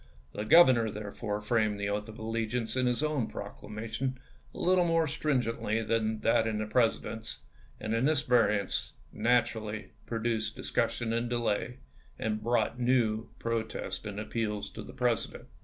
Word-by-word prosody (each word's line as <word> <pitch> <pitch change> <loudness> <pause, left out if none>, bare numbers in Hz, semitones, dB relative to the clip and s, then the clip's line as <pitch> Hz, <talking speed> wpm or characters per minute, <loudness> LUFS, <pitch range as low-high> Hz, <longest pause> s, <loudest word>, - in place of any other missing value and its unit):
The 105 - -3
Grovernor, 120 -5 +7
therefore, 105 0 -4
framed 105 -1 +1
the 100 0 -1
oath 105 +2 -2
of 110 - -9
allegiance 115 +1 -2
in 130 -1 +2
his 125 +4 +1
own 150 -6 0
proclamation 115 +5 -5 0.3
a - - -12
little 180 0 +4
more 165 -1 +3
stringently 120 -7 0
than 110 -1 0
that 115 0 +3
in 110 -1 -1
the 110 - -1
President's, 110 0 0 0.4
and 110 - -2
this 150 -2 +2
variance 110 -5 +2 0.2
naturally 110 -2 0 0.2
pro 115 - -2
duced 110 -1 -1
discussion 115 -1 -1
and 115 +1 0
delay, 120 0 -1 0.4
and 110 -1 -2
brought 120 +2 +1
new 120 -3 +2
pro 115 0 0
tests 110 - -5
and 105 -1 -5
appeals 105 -1 -2
to - - -7
the - - -10
President. - - -1
115 Hz, 155 wpm, -30 LUFS, 110-125 Hz, 0.4 s, Grovernor